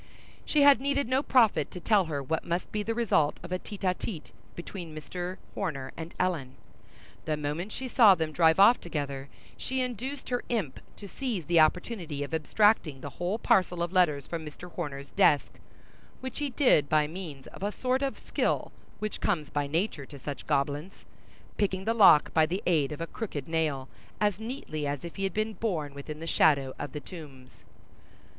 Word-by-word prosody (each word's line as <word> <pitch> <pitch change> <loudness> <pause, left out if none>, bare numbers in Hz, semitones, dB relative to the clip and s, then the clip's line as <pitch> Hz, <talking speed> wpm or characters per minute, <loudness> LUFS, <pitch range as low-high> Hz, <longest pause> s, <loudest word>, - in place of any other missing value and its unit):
She 295 -2 +3
had 280 -3 +7
needed 280 -1 0
no 260 +2 +2
prophet 225 - +3
to 180 - -8
tell 200 0 +3
her 145 -4 -3
what 160 +4 -1
must 170 +1 -2
be 210 - -1
the 225 +2 -2
result 205 -11 +2
of 180 - -9
a 185 - -1
tête 205 0 -9
à 185 -1 +2
tête 175 -7 -6 0.2
between 170 -2 -7
Mr. 180 +4 -5 0.2
Horner 140 -9 -3
and 165 +1 -8
Ellen; 165 -8 -1
and - - -21 0.7
the 155 -1 0
moment 150 +7 -3
she 265 - -5
saw 225 -6 +7
them 160 -2 -2
drive 160 +2 +4
off 230 +5 +7
together, 140 -4 -4 0.3
she 260 0 -2
induced 255 +3 -4
her 245 -1 0
imp 200 - -2 0.2
to 205 - -9
seize 225 - -3
the 170 +2 +4
opportunity 160 -2 +1
of 145 - -7
abstracting 160 -3 +2
the 145 - -6
whole 180 +5 0
parcel 180 -5 +2
of 175 +1 -3
letters 150 -7 +3
from 165 -2 -5
Mr. 155 +4 -10
Horner's 140 -5 -5
desk; 145 - +3 0.6
which 260 -1 -6
he 290 -1 -1
did 245 - +3
by 155 -1 +4
means 155 -4 -7
of - - -12
a 205 +1 -1
sort 255 +4 0
of 275 -1 -1
skill - - -1 0.3
which 215 0 -4
comes 160 -8 0
by 145 -1 -1
nature 155 -2 -2
to 145 - -10
such 140 -1 -7
goblins; 145 +4 -1 0.5
picking 190 -2 0
the 225 - +2
lock 195 -9 +6
by 160 -1 +4
the 185 +5 -3
aid 155 -6 +2
of 150 - -6
a - - -1
crooked 160 -7 -5
nail, 155 -5 -1 0.3
as 205 -2 +1
neatly 220 - -4
as 140 +2 -3
if 170 - -8
he 195 - -1
had 190 - -2
been 215 +1 0
born 165 -11 -2
within 145 +2 -7
the 165 - -6
shadow 140 -5 +3
of 145 -2 -4
the 150 - -4
Tombs. 140 -5 -12
170 Hz, 195 wpm, -29 LUFS, 150-210 Hz, 0.7 s, had